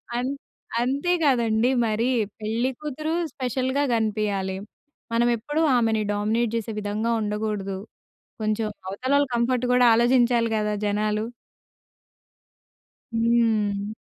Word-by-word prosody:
అం 245 +1 0 0.6
అంతే 280 +8 0
గదండి 235 -4 +3 0.2
మరి, 225 +3 0 0.3
పెళ్లి 225 +4 0
కూతురు 305 +2 -3 0.2
స్పెషల్‌గా 260 +2 -1
గనిపియాలి. 210 -4 -1 0.6
మనం 235 +1 +3
ఎప్పుడూ 295 +8 -2 0.2
ఆమెని 225 -2 +2
డామినేట్ 215 +3 0
జేసే 225 -1 -2
విధంగా 210 +3 -1
ఉండగూడదు. 210 -2 -2 0.7
కొంచెం 215 +1 0 0.2
అవతల 255 +8 -3
వాళ్ళ 285 0 +3
కంఫర్ట్ 240 +1 +1
గూడా 250 0 +5
ఆలోచించాలి 240 0 +3
గదా 210 0 0
జనాలు. 210 +1 0 1.9
హ్మ్. 220 -3 +1
225 Hz, 100 wpm, -24 LUFS, 210-250 Hz, 1.9 s, గూడా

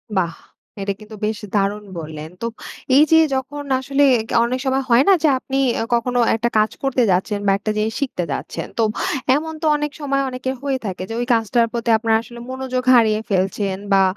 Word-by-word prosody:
বাহ! 170 -3 +1 0.5
এটা 200 0 -1
কিন্তু 215 0 -11
বেশ 215 0 -2 0.2
দারুণ 205 +1 0 0.2
বললেন। 155 0 -7
তো 230 - -1 0.5
এই 295 - +8
যে 320 - +7 0.2
যখন 285 +2 -4 0.2
আসলে 275 +2 +1 0.3
গা - - -2
অনেক 255 +2 -2
সময় 265 0 +1
হয় 240 +3 +6
না - - +8
যে - - +5
আপনি 270 +1 -3 0.2
আ - - 0
কখনো 245 +1 0 0.2
একটা 235 +1 0
কাজ 215 0 +3
করতে 265 -2 +1
যাচ্ছেন 200 +3 0
বা - - +5
একটা 215 +1 -2
জিনিস 215 +1 0
শিখতে 250 -10 -2
যাচ্ছেন, - - -4
তো 230 - +3 0.5
এমন 320 +2 -3
তো - - -2
অনেক 295 0 -2
সময় 275 -1 0
অনেকের 260 +1 -4
হয়ে 275 -2 0
থাকে 185 -1 -4
যে - - -4
ওই 245 - -1
কাজটার 230 +1 +2
প্রতি 235 0 -2
আপনারা 225 0 +2
আসলে 235 0 -12
মনোযোগ 260 -1 -3
হারিয়ে 220 -2 +4
ফেলছেন 190 0 0 0.2
বা 195 - +5
235 Hz, 200 wpm, -20 LUFS, 210-265 Hz, 0.5 s, এই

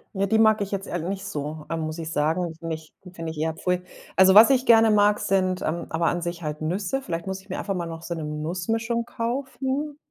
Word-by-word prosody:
Ja, 195 +1 +1
die 220 +3 +2
mag 220 -1 +5
ich 200 -1 -3
jetzt 195 0 -3
ehrl 175 0 -3
nicht 195 0 -3
so, 150 -4 -5
ähm, 165 - -1
muss 155 +1 -4
ich 165 -1 -5
sagen. 160 +3 0
Nich 160 -2 -6 0.2
finde 165 -2 -5
ich 160 - -10
eher 160 0 0
pfui. 180 +2 -1 0.4
Also, 190 +1 +7
was 220 +4 +10
ich 260 -1 +3
gerne 225 -2 +6
mag, 210 0 +4
sind, 185 -1 +1
ähm 170 +2 -2
aber 165 +1 0
an 175 - 0
sich 175 0 -4
halt 150 0 -4
Nüsse. 190 +11 -1
Vielleicht 170 -6 -4
muss 190 0 -3
ich 190 - -19
mir - - -4
einfach 195 - -2
mal 175 -2 -2
noch 165 -1 -7
so 170 - -4
'ne 160 -2 -5
Nussmischung 185 +10 -2
kaufen. 265 +4 -3
180 Hz, 240 wpm, -25 LUFS, 165-215 Hz, 0.4 s, was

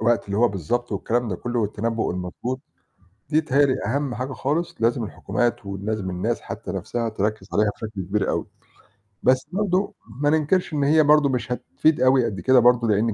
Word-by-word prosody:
الوقت 115 0 +2
اللي 100 - -3
هو 120 +2 +4
بالضبط 105 +6 -2
والكلام 115 +4 -1
ده 95 - -2
كلّه 120 +4 -3
والتنبّؤ 110 +2 -1
المضبوط، 90 +9 -4 0.7
دي 155 +1 +4
بتهيأ 140 -1 +3
لي 130 - +1
أهم 135 +2 -1
حاجة 130 +3 -4
خالص 155 +7 -1
لازم 115 0 +1
الحكومات 120 0 -2
ولازم 100 0 -3
الناس 110 +7 -1
حتى 110 -5 -6
نَفْسها 115 +5 -2
تركّز 105 -1 -2
عليها 105 0 +3
بشكل 105 -3 -6
كبير 95 +3 -1
أوي، - - -2 0.8
بس 130 0 +3
برضه 195 0 0 0.3
ما 145 - +3
ننكرش 160 +3 +1
إن 145 - +1
هي 155 +2 +5
برضه 150 -1 +5
مش 125 -1 -2
هتفيد 155 +4 +1
أوي 130 -1 +4
قد 100 -5 -3
كده 125 +8 +5
برضه، 120 -1 +4
لإن 105 +1 +2
120 Hz, 185 wpm, -23 LUFS, 105-135 Hz, 0.8 s, هي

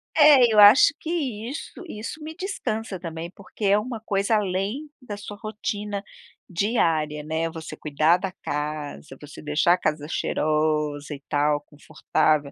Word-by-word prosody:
É, 285 -6 +7
eu 210 - +4
acho 210 +8 +8
que 320 - -7 0.4
isso 285 - -7
isso 230 +6 -7
me 315 +1 -7
descansa 225 - -4
também, 165 -1 -6
porque 200 +2 -8
é 200 +1 +5
uma 230 +2 -4
coisa 200 0 0
além 205 +9 -1
da 210 -5 -6
sua 205 0 -8
rotina 210 -2 -4 0.5
diária, 165 -6 0
né, 160 +2 -1
você 160 -1 -8
cuidar 155 +3 +2
da 190 0 -4
casa, 150 -2 -5
você 150 0 -11
deixar 150 +3 +3
a - - +2
casa 150 -3 -2
cheirosa 150 -2 0
e 140 - -9
tal, 145 0 +2
confortável. 150 0 0
180 Hz, 150 wpm, -24 LUFS, 150-215 Hz, 0.5 s, acho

